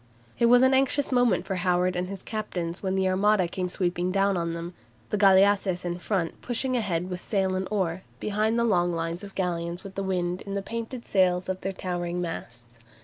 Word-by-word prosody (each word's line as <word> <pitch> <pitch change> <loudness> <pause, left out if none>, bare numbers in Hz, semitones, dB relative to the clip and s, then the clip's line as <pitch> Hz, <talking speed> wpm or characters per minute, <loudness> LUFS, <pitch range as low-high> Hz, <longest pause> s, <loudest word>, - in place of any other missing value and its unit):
It 235 - +5
was 245 +1 +6
an 260 +1 +5
anxious 270 +2 +2
moment 245 -2 +3
for 190 - -2
Howard 180 0 +1
and 180 0 -1
his 195 0 -7
captains 180 -5 -4
when 190 -1 -1
the 190 0 +2
Armada 190 0 +3
came 180 +1 -3
sweeping 180 -1 -1
down 195 +1 +2
on 170 -1 -1
them, 170 +1 -6 0.4
the 210 - +1
galleasses 195 -2 +4
in 175 0 -3
front 180 -3 -2
pushing 255 +2 -1
ahead 180 -7 -1
with 180 -1 -4
sail 190 -3 0
and 185 0 -2
oar, 185 -4 -1 0.2
behind 215 +2 0
the 235 - +2
long 175 -5 +2
lines 165 +2 -3
of 200 -1 -10
galleons 175 -1 -2
with 195 -1 -9
the 195 - -3
wind 180 -1 -1
in 200 0 -5
the 200 - -2
painted 230 +3 -5
sails 180 -2 +2
of 185 0 -3
their 195 - -2
towering 175 -2 -3
masts. 120 -9 -6
185 Hz, 205 wpm, -27 LUFS, 175-205 Hz, 0.4 s, was